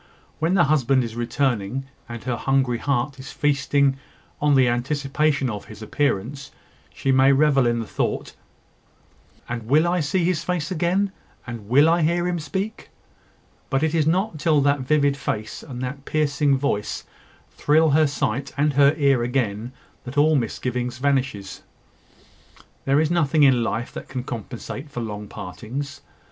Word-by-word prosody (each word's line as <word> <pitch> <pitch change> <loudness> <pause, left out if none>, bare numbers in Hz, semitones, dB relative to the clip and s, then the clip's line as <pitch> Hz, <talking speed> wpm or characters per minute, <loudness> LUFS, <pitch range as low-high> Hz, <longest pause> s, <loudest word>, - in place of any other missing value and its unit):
When 165 +4 +1
the 175 - +5
husband 135 -3 +2
is 115 -1 -6
returning, 120 0 -1 0.2
and 120 -1 -7
her 125 0 -1
hungry 130 -1 +1
heart 135 0 -1
is 130 - -8
feasting 140 -1 +1 0.4
on 145 -1 +4
the 130 -2 +5
anticipation 140 +3 0
of 105 -4 -5
his 110 0 -11
appearance, 140 +2 -1 0.4
she 135 - -1
may 130 +1 +5
revel 135 -2 +4
in 120 0 +1
the 115 - -3
thought - - -3 1.1
"And 115 -2 -5
will 155 +6 +4
I 180 +1 +1
see 170 +4 0
his 170 -2 0
face 175 -3 -2
again, 185 +3 +1 0.3
And 115 -4 -8
will 140 +5 +6
I 170 +1 +3
hear 170 +3 +1
him 175 -1 -1
speak?" 190 +8 -4 0.8
But 135 0 +1
it 160 0 +1
is 155 -2 +2
not 180 0 0
till 155 -1 +3
that 140 +1 +2
vivid 145 +1 +2
face 110 -6 -4
and 125 -1 -7
that 135 +2 -5
piercing 145 -2 +1
voice 130 -7 -2 0.5
thrill 155 +1 +3
her 155 +1 +4
sight 140 -1 -2
and 150 +1 +2
her 140 +2 +5
ear 140 -4 +3
again 120 -2 -1 0.3
that 125 +3 -7
all 155 +2 +5
misgiving 125 0 -1
vanishes. 130 -7 -2 1.2
There 140 +2 +3
is 155 +1 +1
nothing 155 -3 +3
in 130 -3 +5
life 115 +1 -3
that - - -8
can 130 -2 -4
compensate 125 +4 -7
for 125 -4 -5
long 105 -2 -5
partings. 115 - -7
140 Hz, 160 wpm, -23 LUFS, 120-150 Hz, 1.2 s, will